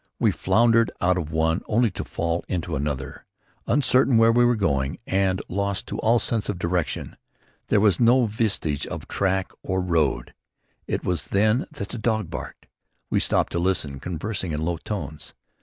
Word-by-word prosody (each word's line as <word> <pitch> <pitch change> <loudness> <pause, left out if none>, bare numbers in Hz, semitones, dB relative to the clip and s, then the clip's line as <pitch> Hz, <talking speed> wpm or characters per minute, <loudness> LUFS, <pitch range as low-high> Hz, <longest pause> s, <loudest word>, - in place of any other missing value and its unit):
We - - +3
floundered 115 0 +3
out 90 +1 +2
of 80 -3 -4
one 80 +2 +1
only 115 0 +2
to - - -5
fall 85 +1 -2
into 90 -3 -2
another, 70 -1 -4 0.4
uncertain 130 -3 +3
where 115 0 +6
we 120 +1 +4
were 120 0 +4
going 70 -10 0
and 95 -1 +1
lost 100 +1 -2
to - - -4
all 115 +2 +3
sense 115 -2 0
of 100 - -2
direction. 90 -1 -2 0.5
There 105 - +3
was 100 -4 +3
no 120 +1 +5
vestige 105 -9 -1
of - - -6
track 95 -1 0
or 95 0 -1
road. 85 -6 0 0.5
It - - -2
was 90 -5 -1
then 110 +5 +2
that 100 - -7
the 120 - -5
dog 110 -6 -1
barked. - - -7 0.5
We - - +3
stopped - - +1
to 85 - -1
listen, 85 -7 0
conversing 90 +2 -3
in 75 +1 -2
low 85 0 -1
tones. 80 -5 -6
95 Hz, 175 wpm, -24 LUFS, 85-110 Hz, 0.5 s, where